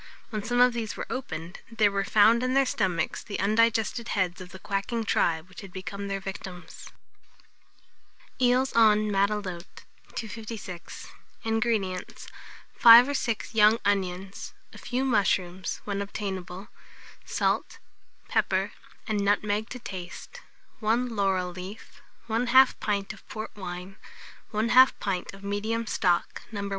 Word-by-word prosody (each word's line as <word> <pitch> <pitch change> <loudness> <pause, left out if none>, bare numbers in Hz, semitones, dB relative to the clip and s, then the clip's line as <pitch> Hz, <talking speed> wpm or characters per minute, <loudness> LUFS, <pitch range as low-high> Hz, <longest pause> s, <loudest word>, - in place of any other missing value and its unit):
When 215 -2 -2
some 245 +2 0
of 250 0 +6
these 225 -3 -4
were - - -4
opened, 170 -9 -5
there 215 -3 +3
were 200 0 0
found 220 +4 +5
in 255 +1 0
their 275 0 +5
stomachs 190 -8 -1
the 205 - -6
undigested 230 +2 +2
heads 185 -2 -1
of 180 - -9
the 190 - -10
quacking 200 +4 -2
tribe 160 -4 +1
which 185 - -11
had 195 - -11
become 195 +2 -6
their 195 0 -2
victims. 190 -2 -8 1.5
EELS 255 +2 +3
EN 215 -2 +5
MATELOTE. 195 -3 -2 0.3
256. 215 -5 -7 0.4
INGREDIENTS. 220 -5 -1 0.5
5 235 +3 +9
or - - -1
6 230 -5 -2
young 215 0 +6
onions, 195 -1 -2 0.2
a - - -11
few 255 +2 -2
mushrooms, 190 -6 0
when 200 -1 -3
obtainable; 195 -2 -5 0.5
salt, - - -1 0.5
pepper, - - +1 0.3
and 215 -3 -1
nutmeg 205 +2 +1
to 255 - -6
taste; 185 -6 -8 0.4
1 230 +2 0
laurel 190 -3 +1
leaf, 185 +4 -10 0.3
1/2 245 +4 +4
pint 200 -1 -2
of 210 - -18
port 215 0 -6
wine, 185 0 -7 0.5
1/2 235 +4 +5
pint 190 -3 -2
of 195 - -15
medium 215 +3 -2
stock, 180 -5 0
No. 200 -2 -4
205 Hz, 130 wpm, -27 LUFS, 190-230 Hz, 1.5 s, 5